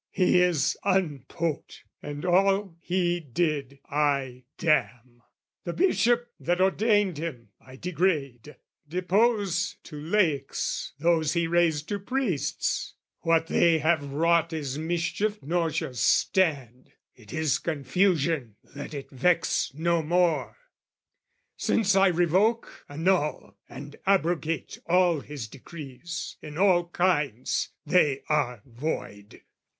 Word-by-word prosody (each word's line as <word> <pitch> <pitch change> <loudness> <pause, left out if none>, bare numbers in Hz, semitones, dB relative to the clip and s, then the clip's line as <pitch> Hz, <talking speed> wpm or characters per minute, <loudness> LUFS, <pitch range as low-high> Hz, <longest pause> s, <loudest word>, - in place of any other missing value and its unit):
"'He 180 -1 +3
is 175 -6 +2
unpoped, 165 - -2 0.2
and 145 +3 -6
all 195 0 +2
he 175 -1 0
did 145 -2 -2
I 140 -4 -1
damn: 125 -7 0 0.4
"'The 170 - -4
Bishop, 240 - +2
that 175 +1 0
ordained 195 -2 +2
him, 130 -9 -6
I 130 0 -13
degrade: 150 -5 -2 0.3
"'Depose 190 +1 +1
to 150 - -10
laics 160 -3 -1
those 160 0 +2
he 170 -1 +1
raised 165 -3 +1
to 205 - -2
priests: 210 - -2 0.2
"'What 165 0 +2
they 165 0 +3
have 155 -2 0
wrought 165 +2 +2
is 145 -5 -3
mischief 175 +7 -1
nor 165 +3 0
shall 135 - -3
stand, 130 - +1 0.2
"'It 110 -3 -16
is 160 -2 0
confusion, 155 - 0 0.2
let 145 +1 -7
it 140 - -7
vex 170 +6 +1
no 170 +2 +1
more! 170 +1 +1 1.0
"'Since 205 -3 +2
I 195 0 +5
revoke, 185 +6 +1
annul 155 +1 0
and 145 +1 -10
abrogate 170 -4 0
"'All 175 -2 +3
his 140 -5 -7
decrees 150 +5 -8
in 150 0 -9
all 180 -2 +3
kinds: 150 - 0 0.2
they 145 -7 +2
are 125 -8 0
void! 115 -5 -6
165 Hz, 115 wpm, -27 LUFS, 145-180 Hz, 1.0 s, I